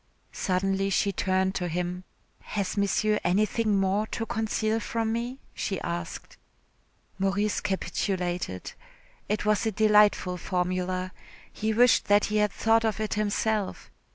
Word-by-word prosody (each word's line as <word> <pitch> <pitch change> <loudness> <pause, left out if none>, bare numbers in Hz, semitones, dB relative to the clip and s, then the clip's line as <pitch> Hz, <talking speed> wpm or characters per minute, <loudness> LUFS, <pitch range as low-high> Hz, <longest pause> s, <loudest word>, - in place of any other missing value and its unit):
Suddenly 195 +1 0
she 200 +1 +2
turned 190 0 0
to 180 -2 -2
him. 180 +2 -3 0.3
"Has 200 -3 -3
Monsieur 210 +1 +1
anything 210 +2 +2
more 195 +3 +1
to 225 - -3
conceal 220 0 -1
from 225 -1 -2
me?" 240 +3 -3 0.2
she 195 - -3
asked. 170 -1 -5 0.8
Maurice 200 +2 +1
capitulated. 180 - -2 0.6
It 210 0 -1
was 215 +1 +2
a - - +1
delightful 210 -3 +4
formula. 185 +1 -2 0.4
He 220 +1 -1
wished 240 +2 +4
that 205 0 +4
he - - +3
had 210 -1 +2
thought 225 0 +2
of 220 -1 0
it 215 -1 -1
himself. 210 0 -1
200 Hz, 130 wpm, -27 LUFS, 185-215 Hz, 0.8 s, delightful